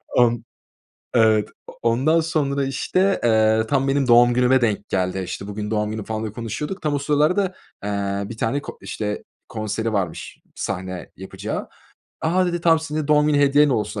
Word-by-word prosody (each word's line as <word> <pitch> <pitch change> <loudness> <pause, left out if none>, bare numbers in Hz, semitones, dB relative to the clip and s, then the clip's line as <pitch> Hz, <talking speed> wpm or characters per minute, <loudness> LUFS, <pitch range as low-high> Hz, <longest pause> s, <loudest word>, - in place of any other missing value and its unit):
On 120 -2 +3 0.7
evet, 110 -3 +4 0.2
o - - -10
ondan 130 +8 +3
sonra 145 -4 0
işte, 185 +8 +1
eee, 110 -1 +4
tam 135 -1 +1
benim 135 -1 +1
doğum 120 0 +6
günüme 125 +1 +3
denk 105 -3 0
geldi. 95 0 -1
İşte, 95 +1 -5
"Bugün 105 +1 -5
doğum 105 -1 0
günüm." 110 -1 -4
falan 110 0 -3
diye 110 - -4
konuşuyorduk. 120 - -5
Tam 150 -1 0
o 145 - 0
sıralarda, 155 +7 +1 0.3
eee, 100 -1 -2
bir 115 - -8
tane 135 +6 -1
ko - - -9
işte, 105 -1 -4 0.3
konseri 110 +1 -3
varmış 95 -5 -3
sahne 90 -1 -5
yapacağı. 95 0 -6 0.5
"A!" 180 +3 +2
dedi. 175 -1 -1
"Tamam 165 -1 +4
senin 155 -1 -3
de 150 - -5
doğum 150 0 +4
günü 150 -1 +3
hediyen 145 +1 +5
olsun 110 -4 -1
120 Hz, 175 wpm, -22 LUFS, 105-150 Hz, 0.7 s, doğum